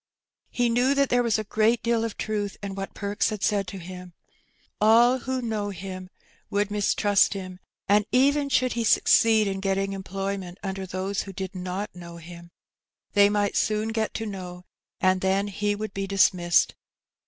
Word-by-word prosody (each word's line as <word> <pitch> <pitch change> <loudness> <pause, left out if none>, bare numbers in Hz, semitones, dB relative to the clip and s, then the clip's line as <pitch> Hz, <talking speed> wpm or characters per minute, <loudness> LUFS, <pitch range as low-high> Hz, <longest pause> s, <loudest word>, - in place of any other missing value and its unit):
He 245 -1 0
knew 245 +4 +2
that 280 -1 +2
there 245 0 +3
was 235 -3 +1
a 215 - -2
great 220 +3 +1
deal 235 -1 +1
of 225 -2 -4
truth 205 -2 -3
in 200 -1 -4
what 195 0 -6
Perks 205 0 -1
had 210 -3 -5
said 200 -2 +1
to 195 - -7
him. 180 0 -9 0.7
All 235 +4 +5
who 260 0 -3
knew 215 -3 -2
him 185 -1 -7 0.4
woald 205 0 0
mistrust 205 -1 +2
him^ 185 -2 -7 0.3
and 205 +1 +3
even 280 +3 +3
should 255 -2 +2
he 235 - -1
succeed 220 0 +4
in 195 -1 -2
getting 195 0 -1
employ 195 +1 -4
ment 180 -1 -9
under 190 -1 -4
those 190 +2 -2
who 195 - -8
did 190 0 -5
not 185 +2 -5
know 170 -1 -10
him^ 170 0 -11 0.6
they 205 -1 +6
might 205 -1 0
soon 215 +1 0
get 220 -1 -2
to 225 - -3
know^ 180 -3 -7 0.4
and 185 0 +2
then 195 +2 +1
he 205 +1 -1
would 215 0 -5
be 195 0 -3
dismissed. 185 -3 +3
200 Hz, 180 wpm, -25 LUFS, 190-220 Hz, 0.7 s, they